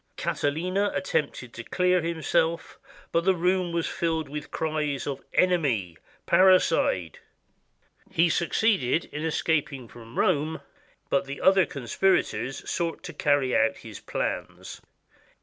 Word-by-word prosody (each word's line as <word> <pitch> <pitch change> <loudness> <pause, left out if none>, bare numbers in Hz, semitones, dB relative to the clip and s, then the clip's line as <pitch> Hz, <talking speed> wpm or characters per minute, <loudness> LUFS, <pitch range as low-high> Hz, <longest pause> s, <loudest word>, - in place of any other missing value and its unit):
Catiline 165 +6 -1 0.2
attempted 140 -9 -2
to 115 - -7
clear 180 +5 +2
himself, 165 0 -1 0.3
but 170 - +1
the 190 +1 +3
room 180 0 +1
was 170 -1 -1
filled 160 -3 -2
with 150 +1 -6
cries 150 -3 -2
of 140 -2 -4
" - - -33
Enemy! 135 - 0 0.3
Parricide!" 165 - +3 0.9
He 170 +2 +3
succeeded 170 - +1
in 150 +1 -4
escaping 155 -5 -1
from 115 0 -13
Rome, 155 -3 +1 0.5
but 140 - +2
the 140 +1 -7
other 190 -1 +4
con 140 -4 -7
spirators 135 - 0
sought 170 -1 -2
to - - -7
carry 145 -3 +1
out 140 0 +2
his 110 -3 -10
plans. - - -4
160 Hz, 130 wpm, -26 LUFS, 140-175 Hz, 0.9 s, other